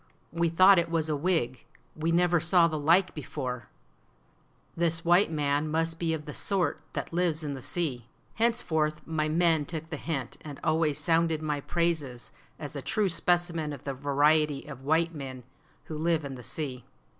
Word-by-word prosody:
We 170 0 +1
thought 185 +3 +6
it 170 0 -1
was 160 -2 0
a 150 - +1
wig; 140 -6 -1 0.3
we 160 +1 -1
never 175 0 +3
saw 170 +1 +5
the 155 -2 -3
like 175 +5 +3
before; 125 -4 -5 1.1
this 165 0 0
white 175 +3 +5
man 145 0 0
must 165 +1 -1
be 165 -1 0
of 150 -1 -8
the 150 - -7
sort 180 -7 0
that - - -5
lives 170 -2 +1
in 145 -2 -3
the 135 - -7
sea." 130 -10 -2 0.3
Henceforth 160 -10 0
my 155 -1 -1
men 165 -1 +3
took 160 +2 -6
the 155 - -3
hint, 140 -6 -4
and 145 -3 -8
always 155 -2 +1
sounded 165 -2 +1
my 150 -1 -1
praises 155 -8 -2 0.3
as 150 0 -6
a 140 - -4
true 210 - 0
specimen 170 -2 0
of 140 - -10
the 140 - -3
variety 145 +1 +2
of 140 -3 -9
white 160 +4 +1
men 130 -4 -7 0.4
who 155 - -7
live 160 0 0
in 140 - -5
the 125 - -9
sea. 130 -1 -5
160 Hz, 180 wpm, -28 LUFS, 145-170 Hz, 1.1 s, thought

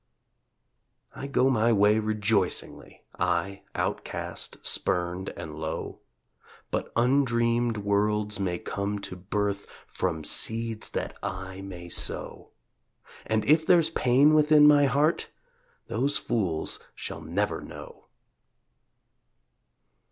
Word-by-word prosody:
I 140 - -6
go 135 -1 +2
my 115 -1 +3
way 105 0 +4
rejoicingly, 105 -3 -1 0.2
I, 90 +2 0
outcast, - - -3
spurned 90 +2 0
and 80 -2 -7
low, 80 0 -5 0.7
But - - -2
undreamed 120 -2 +2
worlds 105 +1 0
may 90 -3 -1
come 100 +3 -3
to 90 - -6
birth 100 +2 -2 0.2
From 80 -4 -3
seeds 115 +6 0
that - - -4
I 95 +1 -5
may 90 -3 -8
sow. - - -2 0.8
And 110 -1 0
if 155 +5 +4
there's 165 -1 +4
pain 135 +2 +4
within 150 -1 +6
my 145 -1 +6
heart 145 +5 +1 0.6
Those 135 +6 +1
fools 90 -9 -1 0.2
shall - - -6
never - - -2
know. - - -11
105 Hz, 105 wpm, -27 LUFS, 95-125 Hz, 0.8 s, within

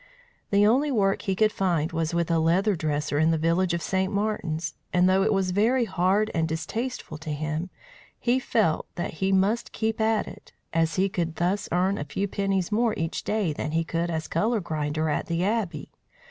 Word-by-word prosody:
The 200 0 +4
only 270 +7 +3
work 195 -5 +2
he 195 -3 -1
could 215 +2 +3
find 175 -5 0
was 165 -1 -1
with 170 0 0
a 165 - +3
leather 185 +6 +2
dresser 150 -2 -1
in 160 +1 +4
the 165 - +2
village 170 +3 +1
of 170 - -4
St. 190 0 0
Martin's, 200 -6 -2 0.2
and 180 0 +4
though 190 +1 +4
it 215 +3 +2
was 190 -2 +1
very 230 +6 +2
hard 195 +2 +1
and 160 -1 +1
distasteful 160 +4 -4
to 160 0 -7
him, 155 +4 -3 0.5
he 250 +2 +2
felt 215 -10 +1
that 175 - -3
he 190 0 +2
must 200 +5 +1
keep 220 0 -1
at 220 -1 +2
it, - - -12 0.2
as 165 -1 +1
he 190 +1 +2
could 170 -4 -2
thus 185 +4 -1
earn 185 +3 +1
a - - -2
few 170 +8 -2
pennies 195 -1 -1
more 225 +1 +2
each 165 0 -3
day 205 -7 0
than 150 +1 -4
he 165 0 +2
could 165 +1 -2
as 160 -1 -3
colour 220 +7 +1
grinder 155 -2 -2
at 150 - -1
the 170 +1 0
Abbey. 195 -9 -2
185 Hz, 200 wpm, -26 LUFS, 165-210 Hz, 0.5 s, The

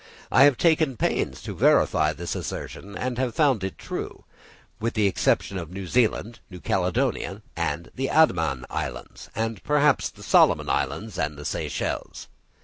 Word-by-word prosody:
I 135 - +7
have 145 -4 +4
taken 160 -6 +2
pains - - -1
to - - -5
verify 75 -1 +3
this 85 +3 -5
assertion, 100 +2 -6
and 125 -1 -3
have 125 -3 -1
found 135 -10 +3
it 95 - -4
true, - - -6 0.6
with 115 +2 -2
the 105 -2 +2
exception 95 -1 +1
of 85 -3 -7
New 95 +1 -6
Zealand, 115 +1 0
New 90 -2 -10
Caledonia, 90 +1 -1
the 130 +10 -3
Andaman 80 - +2
Islands, - - -6
and 115 -2 -3
perhaps 150 -1 +3
the - - -15
Solomon - - +4
Islands 105 -4 -2
and 75 -1 -2
the 75 - -9
Seychelles. - - -4
100 Hz, 150 wpm, -25 LUFS, 85-130 Hz, 0.6 s, I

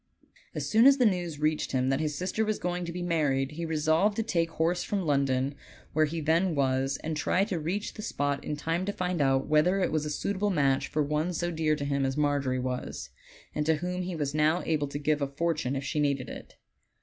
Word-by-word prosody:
As - - -2
soon 225 +4 +6
as 275 0 +7
the 250 - +3
news 175 -6 0
reached 155 -1 0
him 130 0 +1
that 135 0 +1
his 150 -2 -2
sister 190 +4 -1
was 215 -1 0
going 180 0 -2
to 170 - -4
be 175 +1 -4
married 145 -6 +1
he 165 +2 -4
resolved 160 +6 +2
to 225 - 0
take 170 -6 0
horse 165 +2 0
from 195 -3 -2
London, 140 -2 +1 0.4
where 155 +1 +4
he 165 +2 -3
then 165 +3 +2
was, 135 0 +1
and 160 0 -2
try 180 +5 +1
to 195 -5 -2
reach 185 +7 -3
the 215 - -8
spot 145 -7 -2
in 150 - -3
time 165 +4 -1
to - - +1
find 180 -4 -2
out 135 -1 +2
whether 155 +6 +3
it 185 - +1
was 155 -1 0
a - - -3
suitable 200 +7 -1
match 140 -7 +2
for 150 - 0
one 150 +4 -1
so 175 +1 -1
dear 155 -2 +1
to 145 -1 -4
him 140 -1 0
as 135 +1 -1
Margery 145 -3 +1
was, 125 0 -4 0.4
and 150 - -1
to 160 - +4
whom 180 +3 -3
he 180 -1 -4
was 145 -3 -2
now 155 +3 +2
able 150 -3 0
to 140 - -5
give 150 0 0
a 140 - +1
fortune 145 -2 -1
if 135 - -3
she 145 +2 -2
needed 140 -4 0
it. - - -10
155 Hz, 235 wpm, -28 LUFS, 140-175 Hz, 0.4 s, as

